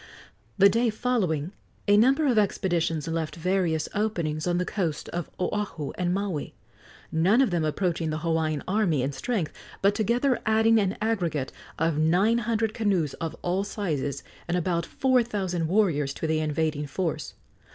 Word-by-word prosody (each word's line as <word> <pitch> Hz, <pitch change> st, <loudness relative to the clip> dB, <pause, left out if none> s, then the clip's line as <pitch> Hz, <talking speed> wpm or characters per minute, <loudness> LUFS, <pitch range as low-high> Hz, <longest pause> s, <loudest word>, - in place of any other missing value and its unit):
The 200 Hz, -, +8 dB
day 230 Hz, +4 st, +2 dB
following 190 Hz, -9 st, -1 dB, 0.4 s
a 205 Hz, -, +6 dB
number 265 Hz, +8 st, +4 dB
of 245 Hz, -6 st, +4 dB
expeditions 170 Hz, -6 st, 0 dB
left 165 Hz, -1 st, -2 dB
various 170 Hz, -2 st, 0 dB
openings 170 Hz, -7 st, -1 dB
on 175 Hz, 0 st, +1 dB
the 180 Hz, -, 0 dB
coasts 170 Hz, -7 st, -2 dB
of 175 Hz, -1 st, -4 dB
Oahu 185 Hz, -6 st, -2 dB
and 175 Hz, -1 st, -1 dB
Maui 190 Hz, -5 st, -2 dB, 0.6 s
none 180 Hz, +9 st, +3 dB
of 265 Hz, -7 st, +3 dB
them 170 Hz, -2 st, +1 dB
approaching 165 Hz, +1 st, -1 dB
the 155 Hz, -, -2 dB
Hawaiian 160 Hz, -2 st, -1 dB
army 185 Hz, -9 st, +1 dB
in 135 Hz, -, -1 dB
strength, 185 Hz, -, -2 dB, 0.3 s
but 200 Hz, +1 st, +3 dB
together 240 Hz, +5 st, +1 dB
adding 220 Hz, +1 st, +4 dB
an 195 Hz, -1 st, 0 dB
aggregate 170 Hz, -11 st, -1 dB, 0.3 s
of 160 Hz, -1 st, +1 dB
nine 185 Hz, +9 st, +3 dB
hundred 225 Hz, -1 st, 0 dB
canoes 190 Hz, -11 st, 0 dB
of 165 Hz, -1 st, -3 dB
all 180 Hz, +3 st, 0 dB
sizes 150 Hz, -, -3 dB, 0.2 s
and 175 Hz, +1 st, 0 dB
about 170 Hz, -1 st, -1 dB
four 260 Hz, -2 st, +2 dB
thousand 190 Hz, -7 st, -2 dB
warriors 160 Hz, -8 st, +1 dB
to -, -, -4 dB
the 160 Hz, 0 st, +1 dB
invading 155 Hz, -1 st, -1 dB
force. 155 Hz, -2 st, -3 dB
180 Hz, 160 wpm, -26 LUFS, 160-210 Hz, 0.6 s, The